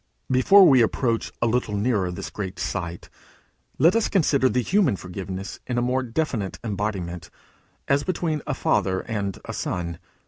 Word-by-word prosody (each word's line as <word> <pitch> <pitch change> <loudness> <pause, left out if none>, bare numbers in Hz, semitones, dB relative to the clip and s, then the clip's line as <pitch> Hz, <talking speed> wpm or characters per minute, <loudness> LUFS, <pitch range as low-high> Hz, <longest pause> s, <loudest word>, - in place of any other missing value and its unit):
Before 185 +10 +7
we 130 -5 +6
approach 115 0 0
a - - +4
little 115 -3 0
nearer 105 -3 +1
to - - -3
this - - -6
great 95 -2 -5
sight, 85 -1 -4 0.7
let 165 +8 +5
us 230 - +2
consider 140 -8 +3
the 125 -1 0
human 180 - +2
forgiveness 95 +1 -6
in 125 - -2
a - - +2
more 130 +2 +1
definite 120 -5 -2
embodiment 95 -5 -3 0.6
as 140 +1 +2
between 165 -4 -1
a - - -1
father 95 -2 +1
and 100 -4 -3
a - - -5
son. 85 -1 -3
115 Hz, 165 wpm, -24 LUFS, 95-135 Hz, 0.7 s, Before